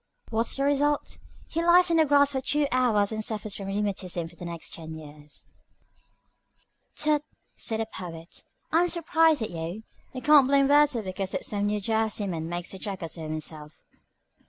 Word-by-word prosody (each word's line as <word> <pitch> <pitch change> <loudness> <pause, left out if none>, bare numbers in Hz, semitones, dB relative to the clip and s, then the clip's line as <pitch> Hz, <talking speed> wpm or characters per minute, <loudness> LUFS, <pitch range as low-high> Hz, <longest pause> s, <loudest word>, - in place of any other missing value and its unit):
What's 225 +1 0
the 275 - 0
result? 285 +1 0 0.3
He 330 - -2
lies 350 +1 +6
on 335 - +3
the 320 - +5
grass 285 0 +4
for 265 -2 -2
two 290 +2 +1
hours 230 -5 +2
and 220 0 -2
suffers 215 -2 -1
from 195 - -6
rheumatism 195 -4 -2
for 170 - -16
the 175 - -9
next 170 -1 -5
ten 160 -1 -6
years." 150 -1 -9 1.5
"Tut!" 300 -1 +2 0.3
said 220 -1 0
the - - -1
Poet. 170 -5 -9 0.3
"I 330 - +4
am 355 - +2
surprised 325 -5 +3
at 215 - -4
you. 170 +5 -5 0.3
You 255 - -7
can't 295 -3 +7
blame 275 0 +4
Wordsworth 290 -6 +4
because 190 0 -3
some 205 -1 0
New 210 0 0
Jerseyman 205 -6 -1
makes 175 +1 -3
a 190 - -8
jackass 185 -5 -4
of 160 -1 -6
himself." 155 -1 -7
215 Hz, 175 wpm, -27 LUFS, 175-285 Hz, 1.5 s, can't